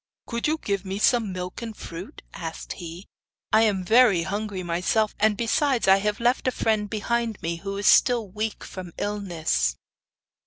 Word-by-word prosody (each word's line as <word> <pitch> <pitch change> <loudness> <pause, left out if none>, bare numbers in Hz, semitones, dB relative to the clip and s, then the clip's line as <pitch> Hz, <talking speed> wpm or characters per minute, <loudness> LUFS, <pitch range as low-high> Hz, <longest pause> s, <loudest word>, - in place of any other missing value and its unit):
'Could 235 +2 -2
you 310 +1 +1
give 200 -9 -2
me 195 0 -4
some 225 -1 +2
milk 180 +4 -5
and 225 -2 -6
fruit?' 170 +3 -9
asked 165 -2 -6
he. 175 +1 -9 0.5
'I 220 - +6
am 205 -4 +2
very 220 -4 +5
hungry 200 0 -3
myself, 180 +5 +1
and, 215 -1 +3
besides, 240 +2 +1
I 190 0 +7
have 205 +1 -1
left 245 +2 +1
a - - +3
friend 215 -4 0
behind 225 +1 -1
me 170 +1 -2
who 195 +3 -5
is 200 - -3
still 235 0 +5
weak 215 +3 -4
from 180 -3 -8
illness. 165 - -1
205 Hz, 170 wpm, -25 LUFS, 180-225 Hz, 0.5 s, I